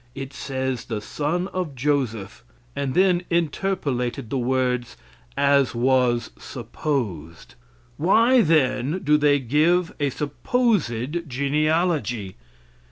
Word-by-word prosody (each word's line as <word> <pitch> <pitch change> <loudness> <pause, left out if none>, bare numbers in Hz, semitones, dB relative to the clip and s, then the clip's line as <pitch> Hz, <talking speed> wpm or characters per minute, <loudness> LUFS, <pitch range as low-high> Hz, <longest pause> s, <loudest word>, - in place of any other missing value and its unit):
It 135 0 -7
says 130 -3 -3
the 110 -3 -3
son 155 - -2
of 180 -7 -4
Joseph, 120 -6 -2 0.3
and 140 -1 -2
then 180 -1 +4
interpolated 145 - -1
the 135 - 0
words 125 -1 -1 0.4
"as 140 -3 +3
was 125 -1 +2
supposed." 115 - -4 0.4
Why, 230 - +4
then, 150 - +1
do 150 +1 +4
they 145 -1 +4
give 155 +7 +2
a 145 -1 +1
supposed 155 - -1
genealogy. 140 - 0
140 Hz, 100 wpm, -23 LUFS, 125-160 Hz, 0.4 s, then